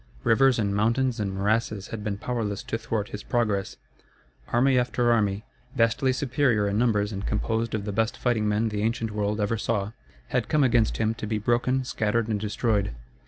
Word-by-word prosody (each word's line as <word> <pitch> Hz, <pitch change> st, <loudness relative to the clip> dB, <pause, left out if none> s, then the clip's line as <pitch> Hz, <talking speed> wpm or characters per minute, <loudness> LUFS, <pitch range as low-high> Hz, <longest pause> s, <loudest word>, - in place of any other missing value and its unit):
Rivers 130 Hz, +2 st, +4 dB
and 100 Hz, -3 st, 0 dB
mountains 115 Hz, +3 st, +1 dB
and 100 Hz, -2 st, -1 dB
morasses 105 Hz, +1 st, -1 dB
had 110 Hz, -2 st, -6 dB
been 105 Hz, -1 st, -2 dB
powerless 110 Hz, -3 st, -3 dB
to -, -, -3 dB
thwart 115 Hz, -2 st, -3 dB
his 105 Hz, -, -6 dB
progress. 105 Hz, -5 st, -1 dB, 0.7 s
Army 130 Hz, +2 st, +3 dB
after 120 Hz, -1 st, +1 dB
army, 105 Hz, -2 st, +1 dB, 0.3 s
vastly 115 Hz, +3 st, +2 dB
superior 130 Hz, -5 st, +1 dB
in 100 Hz, +1 st, 0 dB
numbers 105 Hz, -3 st, +2 dB
and 100 Hz, -1 st, -5 dB
composed 110 Hz, +2 st, -1 dB
of 100 Hz, -2 st, -3 dB
the 105 Hz, -, -2 dB
best 110 Hz, +2 st, 0 dB
fighting 115 Hz, -4 st, 0 dB
men 110 Hz, +2 st, +1 dB
the 105 Hz, -1 st, -3 dB
ancient 115 Hz, 0 st, -1 dB
world 105 Hz, 0 st, -1 dB
ever 105 Hz, +1 st, 0 dB
saw, 105 Hz, -2 st, -1 dB, 0.4 s
had -, -, -1 dB
come 150 Hz, -2 st, +3 dB
against 120 Hz, -4 st, +2 dB
him 110 Hz, 0 st, +1 dB
to 110 Hz, -, -6 dB
be 110 Hz, 0 st, -1 dB
broken, 120 Hz, +4 st, +1 dB
scattered, 115 Hz, -2 st, -1 dB
and 105 Hz, -2 st, 0 dB
destroyed. 105 Hz, -, -1 dB
110 Hz, 185 wpm, -26 LUFS, 105-120 Hz, 0.7 s, Rivers